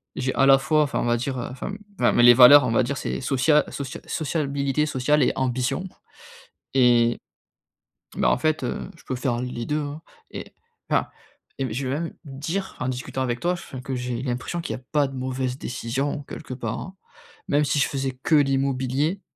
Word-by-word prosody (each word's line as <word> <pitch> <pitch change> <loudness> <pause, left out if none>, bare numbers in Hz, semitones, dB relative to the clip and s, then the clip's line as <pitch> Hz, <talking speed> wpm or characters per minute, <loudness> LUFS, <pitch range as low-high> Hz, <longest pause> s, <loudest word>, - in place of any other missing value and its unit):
j'ai 130 0 -1
à 135 - +3
la 135 0 +8
fois 155 +3 +2
enfin 145 - -2
on - - -1
va 120 - +2
dire, 130 +2 -3
heu, - - -4
enfin 130 +9 -6 0.3
mais 120 - +4
les 120 0 +10
valeurs 130 +4 +9
on 115 - 0
va 115 - +3
dire 140 +3 -3
c'est - - -3
socia 140 +3 +3
socia 135 -2 -6
sociabilité 140 -2 -1
sociale 145 +2 +1
et - - +3
ambition 130 +6 -1 0.9
et 120 -2 +4 1.0
bah, - - +3
en - - +2
fait, 155 0 0
heu, - - -4
je - - -19
peux 130 - -3
faire 125 -2 -1
les 125 -2 -4
2, 150 +1 0
hein 145 +2 -6 0.3
et - - -8 0.4
enfin - - +1 0.5
et 130 -4 -2
je 130 +2 -3
vais 140 +4 -1
même 170 - -5
dire 155 +8 -4
en 130 - -2
discutant 130 +1 -4
avec 120 -2 -1
toi, 175 - +1
enfin, 155 -7 -8
que 130 - -5
j'ai 125 0 -3
l'impression 125 +7 -3
qu'il - - -4
y - - -8
a 130 - -25
pas 145 -2 +3
de 135 - -9
mauvaise 130 0 -3
décision 135 +4 -3
quelque 135 -3 -8
part, 115 -3 -4
hein. 190 0 -8 0.5
Même 145 +1 +3
si 145 +1 0
je 140 - +3
faisais 135 -2 -3
que 160 - 0
l'immobilier, 135 +4 +1
135 Hz, 200 wpm, -24 LUFS, 125-145 Hz, 1.0 s, les